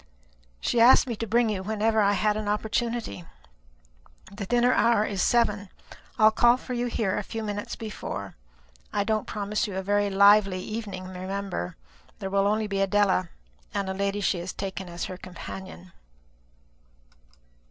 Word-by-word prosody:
She 235 - +1
asked 245 +3 +7
me 240 -3 -3
to 230 - -4
bring 230 +2 +3
you 195 -3 -2
whenever 220 +2 +1
I 200 0 +3
had 210 +2 +1
an 215 -1 -3
opportunity. 215 - -2 1.1
The 200 -1 -6
dinner 245 +2 +3
hour 230 -2 +3
is 195 -3 -2
seven. 210 -4 +2 0.5
I'll 215 -1 +6
call 240 +2 +4
for 255 - -7
you 245 0 -1
here 215 -5 -1
a - - -1
few 225 +2 -5
minutes 205 -1 -4
before. 100 - -6 0.6
I 205 - 0
don't 215 0 -1
promise 210 0 -2
you 200 - -6
a 190 - -2
very 205 +1 +1
lively 200 -1 +5
evening, 200 -2 -5
remember. 185 - -4 0.4
There 190 - -5
will 200 0 +2
only 215 +1 +1
be 200 -1 -1
Adela, 195 -3 +2 0.5
and 195 -1 -1
a - - -1
lady 200 +1 -1
she 185 - +1
has 175 +2 -5
taken 190 -1 -5
as 170 0 -4
her 185 - -7
companion." 95 - -9
205 Hz, 165 wpm, -26 LUFS, 190-220 Hz, 1.1 s, asked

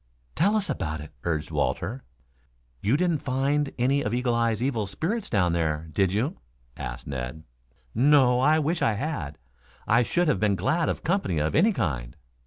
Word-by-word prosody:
"Tell 200 +6 +2
us 210 -2 +1
about 80 -3 -3
it," 75 +1 -9
urged 80 -3 -1
Walter. 125 +5 -2 0.8
"You 115 +8 +2
didn't 170 -2 +1
find 140 +2 0
any 135 +3 +2
of 105 0 -1
Eagle 125 -1 0
eye's 115 -2 +1
evil 115 -6 -1
spirits 195 - -3
down 90 -5 +2
there, 80 -1 -1
did 95 +3 +2
you?" 125 - -1 0.4
asked - - -6
Ned. 65 +3 -5 0.5
"No. 130 0 +4
I 150 +4 +4
wish 160 +2 0
I 115 - +3
had. 100 - -4 0.5
I 115 +2 +4
should 175 +8 +1
have 145 -10 +2
been 105 -2 +2
glad 160 - +1
of - - -3
company 175 - 0
of 75 +1 0
any 200 +9 +4
kind." 60 - -2
120 Hz, 175 wpm, -26 LUFS, -, 0.8 s, No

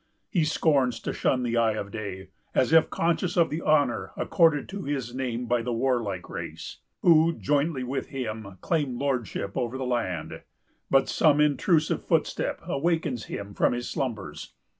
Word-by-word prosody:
He 170 -7 +2
scorns 140 -6 +2
to - - -3
shun 130 -1 +1
the 120 -1 0
eye 115 -1 +3
of 100 -2 -5
day, 100 -3 -6 0.3
as 130 +4 +3
if 160 - +6
conscious 170 +2 0
of 170 -2 +4
the 155 +3 -2
honor 145 -6 +1
accorded 160 -4 +3
to 195 +1 -5
his 135 -7 -3
name 125 -2 -3
by 120 0 +1
the 120 +1 -3
warlike 120 -3 -1
race, - - -7 0.3
who, 165 -1 +6
jointly 145 -2 0
with 130 +2 -3
him, 110 -7 -5
claim 145 -7 0
lordship 125 -7 -2
over 120 +1 -2
the 130 - -3
land. 95 -11 -2 0.5
But 135 0 +4
some 150 -2 +3
intrusive 150 +2 +2
footstep - - 0
awakes 155 -5 -1
him 100 0 -6
from - - +2
his 120 0 -3
slumbers. 110 - -4
130 Hz, 160 wpm, -27 LUFS, 115-155 Hz, 0.5 s, if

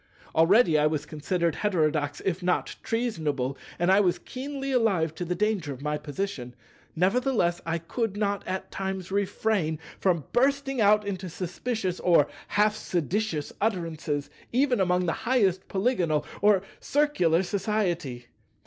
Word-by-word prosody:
Already 165 0 +5
I 150 - +4
was 150 -1 -2
considered 170 +2 -1
heterodox 155 -7 0
if 185 -1 0
not 180 0 0
treasonable, 155 - -1 0.2
and 175 +2 +2
I 195 - +6
was 180 -4 +3
keenly 275 +1 -5
alive 195 - +2
to 180 - -5
the 180 +1 -1
danger 195 -7 0
of 135 +1 -11
my 150 0 -1
position; 145 -5 -4 0.4
nevertheless 190 -1 +1
I 165 0 0
could 205 +5 -3
not 205 -1 0
at 190 0 -4
times 190 -1 -4
refrain 195 -4 0 0.2
from 175 -5 +2
bursting 270 0 +2
out 210 0 +5
into 190 -2 -4
suspicious 185 +2 -3
or 170 -5 +4 0.2
half 210 +1 +2
seditious 175 -3 -2
utterances, 165 -8 -2 0.2
even 255 -1 +2
among 180 -1 +2
the 165 - +1 0.2
highest 195 -8 +2
Polygonal 185 - +1 0.2
or 205 -2 +4 0.2
Circular 190 - +2
society. 175 - -1
185 Hz, 140 wpm, -27 LUFS, 160-215 Hz, 0.4 s, I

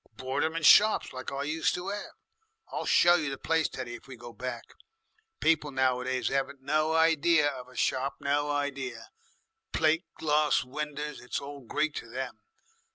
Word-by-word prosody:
"Bort 130 +4 -2
'em 160 +1 -1
in 165 - -3
shops 215 +6 +6
like 130 0 -6
I 140 0 -3
used 155 +2 0
to 180 +2 -4
'ave. 205 0 -4 0.6
I'll - - -4
show 175 - +6
you 155 -5 +1
the 135 - -5
place, 160 +2 +1
Teddy, 125 -2 -6
if 120 - -10
we 135 - -9
go 120 0 -11
back. 125 +4 -5 0.8
People 155 -2 +2
nowadays 130 -2 0
'aven't 135 0 -2
no 155 +3 +1
idee 165 0 +4
of 135 -4 -2
a 130 - -17
shop 135 +3 0
no 145 +1 0
idee. 140 -3 -2 0.8
Plate 160 +3 +2
glass 150 -1 +2
winders 150 +2 -5
it's 125 - -3
all 140 0 -8
Greek 150 +6 -1
to 115 - -7
them. 130 +1 -4
145 Hz, 170 wpm, -29 LUFS, 130-155 Hz, 0.8 s, shops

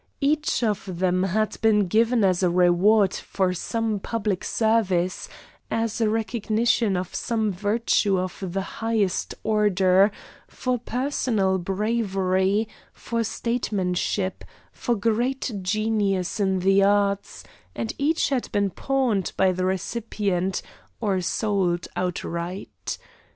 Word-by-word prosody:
Each 300 -2 +1
of 200 -5 -2
them 185 0 +1
had 205 +3 -1
been 210 -2 +4
given 225 +4 +2
as 185 -2 +3
a 180 - +3
reward 180 +3 +4
for 185 -2 -1
some 220 +3 -2
public 210 -2 -2
service, 195 -6 +1 0.4
as 225 0 -1
a 220 - +3
recognition 225 -1 +1
of 180 0 -4
some 220 -3 -1
virtue 205 0 +1
of 185 0 -2
the 190 +1 -2 0.2
highest 220 -5 0
order 200 -2 +4 0.4
for 255 -1 -2
personal 230 -6 0
bravery, 195 0 0 0.2
for 230 -1 -3
statesmanship, 200 -5 -1 0.3
for 240 - -1
great 235 +5 0
genius 205 -1 0
in 190 -2 +1
the 195 +1 +4
arts; 200 0 +1 0.3
and 115 -1 -3
each 305 +3 +2
had 265 -3 -1
been 200 -2 +1
pawned 255 -8 0
by 190 -1 +4
the 185 0 -1
recipient 190 -1 -1 0.4
or 200 -5 0
sold 185 -2 0
outright. 180 +1 -4
205 Hz, 115 wpm, -24 LUFS, 185-225 Hz, 0.4 s, been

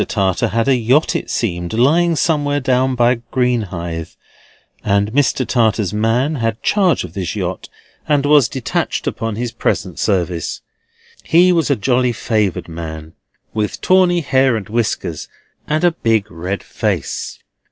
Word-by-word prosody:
Tartar 95 -4 0
had 115 +3 0
a 135 - +4
yacht, 125 +6 +2
it - - -3
seemed, 85 -5 -2
lying 160 +9 +3
somewhere 145 -2 +1
down 130 0 +1
by 120 0 +2
Greenhithe; 95 -10 -2 0.7
and 100 +1 +1
Mr. 130 0 +1
Tartar's 110 -5 +1
man 120 +8 +1
had 115 -2 -2
charge 190 -5 +2
of 90 -2 -9
this 90 -2 -4
yacht, 95 -2 -4 0.4
and 145 -2 +2
was 145 -5 +5
detached 130 -3 -2
upon 115 -2 -3
his 120 +1 -3
present - - -2
service. 90 -4 -1 0.6
He 180 +2 +4
was 165 -4 +1
a 140 - +3
jolly 125 +2 +1
favoured 105 -4 -1
man, 80 -1 -7 0.4
with 105 -1 -2
tawny 180 -2 +3
hair 130 -4 +2
and 105 -4 -4
whiskers, 105 -7 -2 0.4
and 155 +2 0
a 175 - +5
big 110 -8 0
red 90 +5 -4
face. - - -3
115 Hz, 145 wpm, -18 LUFS, 100-140 Hz, 0.7 s, was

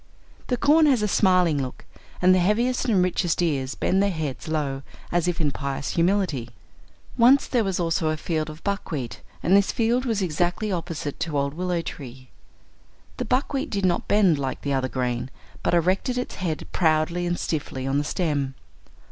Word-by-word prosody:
The 250 - 0
corn 305 +4 +5
has 255 -7 +3
a - - +2
smiling 180 -7 +3
look 130 -1 -7 0.4
and 185 +1 +7
the 185 - +4
heaviest 235 +8 +1
and 205 -7 +3
richest 175 -2 0
ears 140 -6 0
bend 190 - +1
their 200 - +2
heads 155 -8 -4
low 145 -4 -2 0.3
as 175 0 +1
if 175 - -1
in 150 -3 +1
pious 140 0 -3
humility. 170 - +1 0.7
Once 255 +4 +6
there 245 -3 +1
was 190 -3 -1
also 165 -2 +1
a 155 - -1
field 155 -1 -2
of 155 +1 -10
buckwheat, 160 - -3 0.2
and 185 - +4
this 200 0 +4
field 240 +2 +1
was 220 -5 0
exactly 175 +5 -1
opposite 165 -5 -4
to 160 -3 -2
old 140 0 0
willow 180 +1 -1
tree. 130 -4 -9 0.9
The - - -2
buckwheat 270 +1 0
did 200 -2 -1
not 175 -2 +1
bend 195 -8 +4
like 135 -2 -3
the 140 - -1
other 130 -1 0
grain, 125 -1 -2 0.3
but - - +1
erected 185 +9 +1
its 250 - -3
head 165 -4 -3
proudly 170 +1 +1
and 175 0 -1
stiffly 140 -4 -3
on 135 +1 +1
the - - 0
stem. 145 -5 -1
170 Hz, 180 wpm, -24 LUFS, 145-200 Hz, 0.9 s, and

